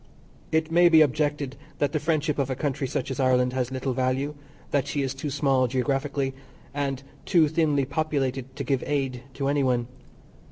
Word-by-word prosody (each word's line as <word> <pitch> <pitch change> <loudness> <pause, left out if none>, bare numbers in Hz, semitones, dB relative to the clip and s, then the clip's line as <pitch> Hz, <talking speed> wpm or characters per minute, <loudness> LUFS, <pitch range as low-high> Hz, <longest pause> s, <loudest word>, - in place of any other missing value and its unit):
It 160 0 +1
may 175 +1 +6
be 160 -2 +7
objected 145 -1 -1 0.2
that 145 -1 +1
the 155 - 0
friendship 155 -1 0
of 135 -1 0
a 130 - -1
country 135 -1 -2
such 130 - -3
as 135 - -4
Ireland 125 -1 +3
has 125 -2 -1
little 130 0 -2
value; 130 +3 0 0.4
that 140 -2 +1
she 145 - -1
is 135 -1 -2
too 140 +2 -4
small 135 -2 +2
geographically, 135 +2 -1 0.4
and 140 -2 -2 0.2
too 165 -5 +4
thinly 150 -3 +2
populated 135 -3 -2
to 140 - -3
give 135 -1 0
aid 135 -4 -1
to 135 -1 -1
any 145 0 +2
one. 125 -3 +1
140 Hz, 185 wpm, -26 LUFS, 130-150 Hz, 0.4 s, be